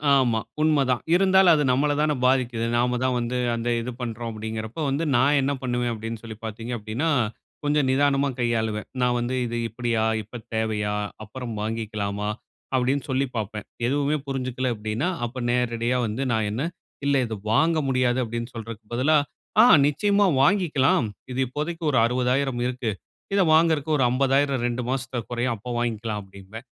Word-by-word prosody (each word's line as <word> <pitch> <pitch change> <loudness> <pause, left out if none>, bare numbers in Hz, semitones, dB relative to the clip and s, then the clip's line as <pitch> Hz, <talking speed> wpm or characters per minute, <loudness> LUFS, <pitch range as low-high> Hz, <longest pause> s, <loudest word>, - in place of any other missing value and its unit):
ஆமா. 120 -4 +3 0.2
உண்மை 155 -2 +4
தான். 125 - +1
இருந்தாலும் 190 -1 +6
அது 150 - +2
நம்மள 145 +3 +2
தான 150 0 +2
பாதிக்குது. 125 -3 +2
நாம 125 +1 +1
தான் 130 -1 +1
வந்து 120 +1 -2 0.2
அந்த 115 +1 -2
இது 125 +2 -4
பண்றோம் 115 0 -4
அப்படிங்கிறப்போ, 110 +4 -5
வந்து 140 +5 0
நான் 140 +4 +4
என்ன 135 +1 0
பண்ணுவேன் 120 -1 0
அப்படின்னு 115 0 -6
சொல்லி 110 -2 -8
பார்த்தீங்க 115 +2 -6
அப்படின்னா, 110 +10 -2 0.5
கொஞ்சம் 145 -1 +2
நிதானமா 140 +1 +2
கையாளுவேன். 110 -3 -1
நான் 125 0 +2
வந்து, 120 +2 -2
"இது 120 0 -3
இப்படியா, 115 -1 -1 0.2
இப்ப 115 +4 -9
தேவையா, 110 -2 -1 0.3
அப்புறம் 115 +2 -7
வாங்கிக்கலாமா?" 105 -2 -3 0.5
அப்படின்னு 130 +2 +1
சொல்லி 130 +1 +1
பார்ப்பேன். 105 -1 -4 0.2
எதுவுமே 145 +3 +1
புரிஞ்சுக்கல 130 -1 -2
அப்படின்னா, 110 +7 -2 0.2
அப்ப 120 +2 -7
நேரடியா 120 0 0
வந்து 110 +6 -2
நான் 110 -2 +1
என்ன 120 +7 -2 0.4
"இல்ல, 140 0 +3
இது 110 -1 -4 0.2
வாங்க 160 +7 +3
முடியாது." 125 -1 +2
அப்படின்னு 115 +1 -4
சொல்றக்கு 115 -1 -7
பதிலா, 140 +6 +3 0.4
"ஆ - - +8 0.2
நிச்சயமா 200 +7 +2 0.2
வாங்கிக்கலாம். 150 - +3 0.3
இது 125 - -3
இப்போதைக்கு 155 +6 -4
ஒரு 135 - +3
60,000 125 +1 0
இருக்கு. 125 -3 -2 0.4
இத 200 - +4
வாங்குறக்கு 160 -2 +3
ஒரு 135 - +2
50,000 135 0 +2
2 120 +1 -2
மாசத்துல 130 -2 -2
குறையும், 120 0 0
அப்ப 120 +4 -7
வாங்கிக்கலாம்." 110 -3 -2
அப்படிம்பேன். 100 +4 -11
125 Hz, 155 wpm, -24 LUFS, 115-135 Hz, 0.5 s, ஆ